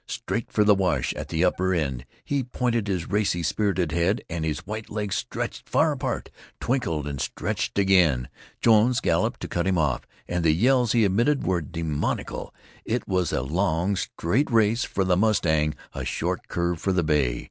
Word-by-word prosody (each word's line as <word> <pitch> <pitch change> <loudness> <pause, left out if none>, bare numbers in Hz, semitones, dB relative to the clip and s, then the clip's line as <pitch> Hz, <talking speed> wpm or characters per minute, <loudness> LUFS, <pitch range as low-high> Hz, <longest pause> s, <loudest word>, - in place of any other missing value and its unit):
Straight - - -4
for 105 - +3
the 105 0 +6
wash 95 -3 0
at - - -6
the 85 +2 +1
upper 95 +1 +1
end 65 -6 -2 0.2
he 140 -1 0
pointed 120 -3 -1
his 90 -4 -2
racy, 100 -4 0
spirited 95 -2 0
head, 85 +7 +1
and 85 -1 -2
his 80 -2 -3
white 110 +1 -6
legs 105 -2 -2
stretched - - -4
far - - +3
apart, - - -3 0.3
twinkled 120 - -1
and 70 -2 -4
stretched 90 -5 -3
again. 90 -10 +3 0.3
Jones 115 +2 +4
galloped - - 0
to - - -4
cut 85 +1 -1
him 95 -2 +2
off, 75 -5 0 0.2
and 90 -1 -1
the 80 -2 +4
yells 120 +5 +3
he 115 -2 +4
emitted 120 +9 +2
were 90 -1 +1
demoniacal. 80 -1 -3 0.3
It 115 +1 -2
was 90 -3 0
a 65 - 0
long, 85 +5 0
straight 95 - -1
race 115 0 +3
for 95 - -1
the 90 -1 +2
mustang, 80 -7 +2 0.2
a - - -4
short - - -2
curve 85 -1 -1
for 95 - +1
the 90 -2 +2
bay. 70 -6 +1
95 Hz, 180 wpm, -25 LUFS, 80-105 Hz, 0.3 s, the